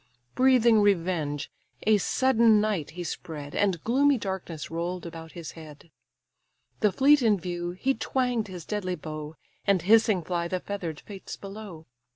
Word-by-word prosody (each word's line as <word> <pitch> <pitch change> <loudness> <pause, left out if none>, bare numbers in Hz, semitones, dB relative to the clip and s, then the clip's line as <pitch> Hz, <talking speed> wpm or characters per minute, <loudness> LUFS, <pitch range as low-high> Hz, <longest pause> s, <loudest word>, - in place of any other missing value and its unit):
Breathing 250 -4 +5
revenge, 170 -7 0 0.3
a 215 -1 +4
sudden 230 -1 +4
night 210 -8 -1
he 175 - -3
spread, 150 -4 -6
And 190 -5 0
gloomy 275 +4 +3
darkness 190 -7 -5
roll'd 175 +2 -3
about 165 -1 -9
his 170 -2 -7
head. 155 0 -13 0.9
The 210 -3 +3
fleet 280 +8 +5
in 215 -5 +3
view, 175 0 -4
he 260 +9 0
twang'd 250 -5 -1
his 180 -4 -8
deadly 190 -4 -2
bow, 155 -1 -7 0.3
And 195 -4 +3
hissing 215 -2 +4
fly 170 0 -2
the 185 +1 -2
feather'd 175 -6 -5
fates 195 -2 -9
below. 195 -5 -9
185 Hz, 150 wpm, -27 LUFS, 165-220 Hz, 0.9 s, Breathing